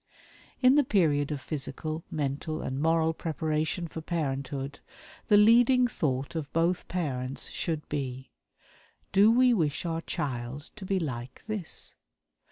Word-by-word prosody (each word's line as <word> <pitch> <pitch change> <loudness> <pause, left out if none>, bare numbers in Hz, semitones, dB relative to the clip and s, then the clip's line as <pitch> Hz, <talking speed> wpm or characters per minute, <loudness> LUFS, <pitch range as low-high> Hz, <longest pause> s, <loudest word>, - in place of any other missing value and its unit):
In 255 +1 +7
the 295 0 +5
period 155 - +2
of 145 - -2
physical, 155 +3 -4
mental, 150 +2 -2
and 130 +2 -3
moral 160 0 +3
preparation 160 +1 -2
for 160 - -7
parenthood 140 -4 -3 0.5
the 210 - +6
leading 240 +4 +6
thought 135 - -2
of 155 -3 -4
both 170 +2 +1
parents 135 -7 -3
should 160 -3 -3
be: 130 -3 -4 0.8
"DO 200 +2 +6
WE 250 +1 +5
WISH 160 -6 0
OUR 165 -1 -1
CHILD 130 -1 -4
TO 205 -3 -8
BE 195 - +1
LIKE 130 -5 -5
THIS?" 215 -6 -3
155 Hz, 135 wpm, -29 LUFS, 140-180 Hz, 0.8 s, In